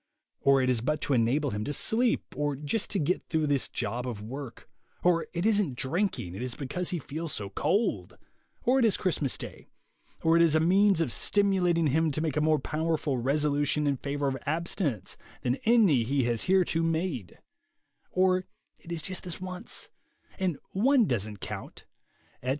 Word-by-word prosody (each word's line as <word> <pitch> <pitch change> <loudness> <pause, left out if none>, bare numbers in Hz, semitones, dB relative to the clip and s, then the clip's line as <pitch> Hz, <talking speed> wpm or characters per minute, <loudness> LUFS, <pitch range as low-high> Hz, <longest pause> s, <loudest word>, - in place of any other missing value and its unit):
Or 135 -1 +4
it 130 - +1
is 120 -3 +1
but 150 +5 0
to 140 - 0
enable 130 +4 +2
him 105 0 -3
to 145 - -2
sleep, 230 - 0
or 145 +1 -1
just 150 +10 -1
to 200 - 0
get 175 +2 0
through 160 -2 +1
this 140 -3 0
job 125 +2 -3
of 115 -4 -4
work; 130 +3 -8 0.4
or 175 -2 +3
it 175 +2 -2
isn't 205 - +2
drinking, 130 - -1
it 95 - -6
is 125 -1 -2
because 160 +6 -2
he 180 - -1
feels 155 +2 -5
so 100 -2 -4
cold; 205 - 0 0.5
or 260 +2 +3
it 245 - +4
is 215 - +3
Christmas 155 -7 0
day; - - -9 0.6
or 165 0 +4
it 170 - +5
is 165 -2 +4
a - - +5
means 190 +2 +4
of 155 - 0
stimulating 185 - +2
him 160 +3 +2
to 150 - -2
make 155 -3 -1
a 150 - +2
more 155 0 +3
powerful 155 -1 -1
resolution 145 +2 +1
in 140 -2 +1
favor 140 +1 -2
of 135 -1 -1
abstinence 155 - -2 0.3
than 125 +2 +1
any 215 - +5
he 135 +3 +1
has 120 -2 -1
hitherto 180 -3 +2
made; 165 - -2 0.7
or 185 0 +2 0.3
it 170 - -12
is 165 -2 -3
just 185 -1 -4
this 175 -2 -6
once, 185 0 -6 0.5
and 180 -6 0
one 245 +4 +4
doesn't 105 - -2
count, - - -7 0.6
etc. 125 - -3
155 Hz, 185 wpm, -28 LUFS, 135-180 Hz, 0.7 s, it